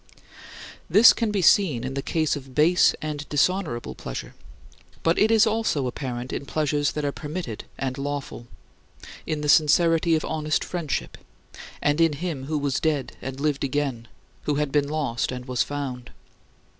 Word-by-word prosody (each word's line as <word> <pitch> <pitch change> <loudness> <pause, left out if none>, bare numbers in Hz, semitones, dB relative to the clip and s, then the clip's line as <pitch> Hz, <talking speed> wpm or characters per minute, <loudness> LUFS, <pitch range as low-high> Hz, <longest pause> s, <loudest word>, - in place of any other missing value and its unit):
8. - - -26 0.7
This 220 +4 +8
can 230 -2 -1
be 200 -3 0
seen 155 - +4
in 130 +1 -4
the 135 - -2
case 155 +1 0
of 135 -2 -10
base 165 +4 +4
and 150 -1 -5
dishonorable 150 -4 0
pleasure. - - -7 0.7
But 165 +1 +2
it 215 - +4
is 225 -1 +5
also 220 -11 0
apparent 125 0 -4
in 140 - -5
pleasures 150 -2 0
that 150 -1 -2
are 140 - 0
permitted 150 - -6
and 130 0 -3
lawful: 140 -4 -5 0.8
in 155 -1 -2
the 150 - -2
sincerity 165 +2 +4
of 155 - -1
honest 155 -1 -1
friendship; 170 -6 -4 0.6
and 145 +2 +2
in 165 -2 +4
him 145 -3 -4
who 155 +2 -2
was 140 -2 -1
dead 150 -4 -1
and 135 +1 -6
lived 145 -1 0
again, 135 -4 -2 0.4
who 150 - +1
had 150 -1 -1
been 145 -1 +2
lost 140 -8 -1
and 125 -1 -6
was 125 -2 -1
found. 135 -4 -4
145 Hz, 170 wpm, -24 LUFS, 135-160 Hz, 0.8 s, This